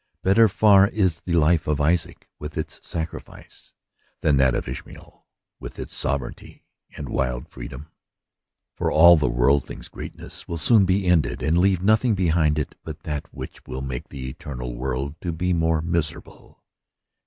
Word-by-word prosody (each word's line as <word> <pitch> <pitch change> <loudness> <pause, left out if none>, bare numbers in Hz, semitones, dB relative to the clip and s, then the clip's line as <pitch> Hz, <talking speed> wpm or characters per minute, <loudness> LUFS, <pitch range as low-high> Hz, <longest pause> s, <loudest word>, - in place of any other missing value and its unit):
Better 110 +4 +5
far 100 -1 +5
is 95 -6 0
the 90 - -2
life 80 0 +3
of 75 -1 0
Isaac 80 +3 0
with 75 0 -7
its - - -5
sacrifice, 80 -2 -8 0.5
than 75 -3 +3
that 65 -2 +3
of - - -3
Ishmael 65 +1 -10 0.3
with - - -9
its - - -7
sovereignty 65 -2 -4 0.3
and - - -6
wild 60 -2 -2
freedom; 70 +1 -9 0.9
for - - -1
all 85 +2 +8
the 75 - +1
worldling's 60 +3 0
greatness - - -9
will 85 - -4
soon 100 +5 +4
be 95 +1 +1
ended 85 -6 +1
and 75 +2 +2
leave 90 0 +3
nothing 110 +2 +3
behind 80 -4 +2
it 75 - -2
but 80 -1 -8
that 75 -2 -5
which - - -9
will 65 +1 -5
make 65 -2 -5
the 65 -1 -7
eternal 60 -2 -6
world 65 +4 -4
to 85 - -2
be 90 +3 -1
the 85 - 0
more 80 -1 +1
miserable. 85 -3 -4
80 Hz, 165 wpm, -23 LUFS, 70-90 Hz, 0.9 s, all